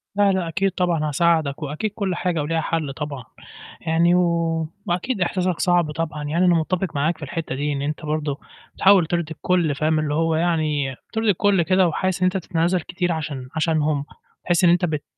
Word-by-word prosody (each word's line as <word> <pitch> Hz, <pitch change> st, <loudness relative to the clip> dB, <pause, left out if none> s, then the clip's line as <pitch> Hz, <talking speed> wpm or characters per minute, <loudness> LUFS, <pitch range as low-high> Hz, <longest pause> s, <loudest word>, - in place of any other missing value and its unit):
لا، 205 Hz, -1 st, +4 dB
لا، 185 Hz, -3 st, -1 dB
أكيد 190 Hz, +4 st, 0 dB
طبعًا 170 Hz, -4 st, 0 dB
هاساعدك 160 Hz, -1 st, +1 dB
وأكيد 155 Hz, +9 st, -3 dB
كلّ 195 Hz, -4 st, -1 dB
حاجة 175 Hz, -3 st, -1 dB
وليها 160 Hz, +2 st, -1 dB
حَل 155 Hz, -4 st, -2 dB
طبعًا، 140 Hz, -4 st, -5 dB, 0.6 s
يعني 170 Hz, +2 st, +2 dB
و 180 Hz, -, +4 dB, 0.6 s
وأكيد 185 Hz, +5 st, -1 dB
إحساسك 180 Hz, -1 st, 0 dB
صعب 175 Hz, -4 st, +2 dB
طبعًا 150 Hz, -1 st, -4 dB
يعني 165 Hz, +5 st, +1 dB
أنا 175 Hz, -, +5 dB
مُتّفق 170 Hz, +2 st, -1 dB
معاك 155 Hz, +4 st, 0 dB
في -, -, -17 dB
الحتّة 165 Hz, -1 st, -4 dB
دي 145 Hz, +2 st, -1 dB
إن 140 Hz, -1 st, -3 dB
أنت 150 Hz, +2 st, -4 dB
برضه 150 Hz, -2 st, -2 dB, 0.4 s
بتحاول 190 Hz, -4 st, +5 dB
ترضي 170 Hz, -2 st, -2 dB
الكلّ 160 Hz, -1 st, 0 dB
فاهم، 155 Hz, +2 st, +1 dB
اللي 150 Hz, -1 st, -1 dB
هو 165 Hz, +1 st, +1 dB
يعني 155 Hz, -5 st, 0 dB, 0.2 s
ترضي 220 Hz, -1 st, +1 dB
الكلّ 200 Hz, -1 st, +3 dB
كده 185 Hz, +2 st, +3 dB
وحاسس 185 Hz, +2 st, -1 dB
إن -, -, +5 dB
أنت 185 Hz, +1 st, +1 dB
بتتنازل 175 Hz, 0 st, 0 dB
كتير 175 Hz, +1 st, -2 dB
عشان 145 Hz, -5 st, -4 dB
عشانهم، 155 Hz, -3 st, +1 dB, 0.4 s
بحيث 175 Hz, 0 st, +2 dB
إن 170 Hz, -, +6 dB
أنت 180 Hz, +1 st, +3 dB
بت 150 Hz, -3 st, -2 dB
165 Hz, 190 wpm, -22 LUFS, 150-180 Hz, 0.6 s, إن